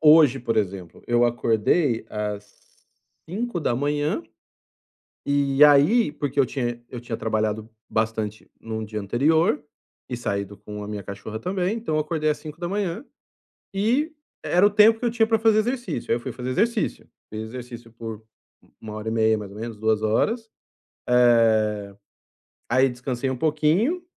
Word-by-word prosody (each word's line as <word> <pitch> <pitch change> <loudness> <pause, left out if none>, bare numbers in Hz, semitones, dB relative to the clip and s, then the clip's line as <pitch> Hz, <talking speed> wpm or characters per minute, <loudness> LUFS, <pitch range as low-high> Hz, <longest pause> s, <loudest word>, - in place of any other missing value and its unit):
hoje, 145 -5 +5
por 115 -2 -1
exemplo, 95 -4 -3
eu 120 0 +4
acordei 120 +2 +1
às 105 -1 -4 0.8
5h 155 - -1 1.0
e 140 0 +4
aí 150 +9 +6
porque 145 -2 -3
eu 135 - +6
tinha 120 -2 -3
eu 125 - -6
tinha 120 -2 -5
trabalhado 110 0 -1 0.2
bastante 110 -1 -2
no 110 -1 -4
dia 105 0 -5
anterior 150 - +2 0.5
e 125 - -3
saído 100 -3 -3
com 105 +1 -8
a - - -7
minha 105 -1 -5
cachorra 100 +3 -7
também, 185 - -1
então 220 -9 -2
eu 155 - +2
acordei 155 0 -1
às 150 - 0
5h 175 - -4 0.7
e 245 +11 +1 0.3
era 180 +3 +4
o - - +4
tempo 215 +2 +6
que - - -4
eu - - +2
tinha 225 -1 +2
pra 225 0 +2
fazer 220 0 +4
exercício. 240 - -3
Aí - - +4
eu - - -5
fui - - -5
fazer 125 0 -5
exercício, 225 - 0 0.3
fiz 110 0 -4
exercício 120 0 -9
por 115 -2 -7 0.6
1 110 -1 -8
hora 110 +1 -5
e - - 0
meia 110 -1 +2
mais 105 -2 -7
ou 105 - -10
menos, 115 -1 -6
2 110 0 +1
horas, 220 - 0 0.6
eh, 110 -4 +3 0.7
aí 130 +3 +4
descansei 125 +1 -3
um 130 - -2
pouquinho 160 - +1
125 Hz, 155 wpm, -24 LUFS, 110-165 Hz, 1.0 s, aí